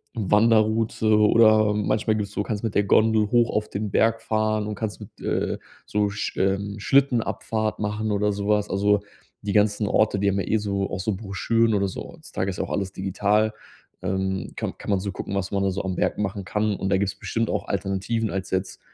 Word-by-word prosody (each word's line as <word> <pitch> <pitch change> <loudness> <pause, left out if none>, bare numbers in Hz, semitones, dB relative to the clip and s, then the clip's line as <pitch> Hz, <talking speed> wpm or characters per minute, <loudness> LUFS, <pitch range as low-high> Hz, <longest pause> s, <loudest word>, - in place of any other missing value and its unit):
Wanderroute 110 +1 +2
oder 110 0 +5
manchmal 105 +1 +1
gibt's 105 -1 -3
so 105 - -1
kannst 105 -2 -3
du - - +1
mit 105 - -7
der 100 - +4
Gondel 110 +1 +3
hoch 120 -1 +4
auf 105 0 -1
den 105 +1 -3
Berg 115 +2 +2
fahren 110 -1 0
und 105 - -4
kannst 105 0 -4
mit, - - -12
äh, - - -1 0.3
so 105 0 +1
Sch 105 - -4
ähm, 100 +1 0
Schlittenabfahrt 115 -3 +1
machen 105 +1 -2
oder 105 0 +1
so 100 0 -3
was. 105 -1 +2
Also, 100 +2 +2 0.5
die 100 - -1
ganzen 105 0 +2
Orte, 105 -1 +2
die 100 0 +2
haben 100 0 0
ja - - -3
eh - - +2
so 100 -2 -2
auch 90 - -3
so 105 +1 -1
Broschüren 110 +3 +1
oder 100 -1 +2
so. - - -7
Heutzutage 95 - -4
ist 90 - -5
auch - - -4
alles 95 -1 -2
digital, 105 +3 +1 0.5
ähm, 95 0 -2
kann - - -4
kann - - -8
man 100 -2 +2
so 100 +1 -3
gucken, 95 - -5
was 100 -1 -2
man 100 -1 0
da 100 - +2
so 95 +1 -3
am 95 -1 -2
Berg - - 0
machen 100 -1 -3
kann. 105 +1 0
Und 95 - -3
da 100 - +3
gibt's 100 0 -1
bestimmt 115 -1 -1
auch - - -2
Alternativen 100 +3 -1
als 95 -1 -4
jetzt 95 0 -2
105 Hz, 215 wpm, -24 LUFS, 100-110 Hz, 0.5 s, oder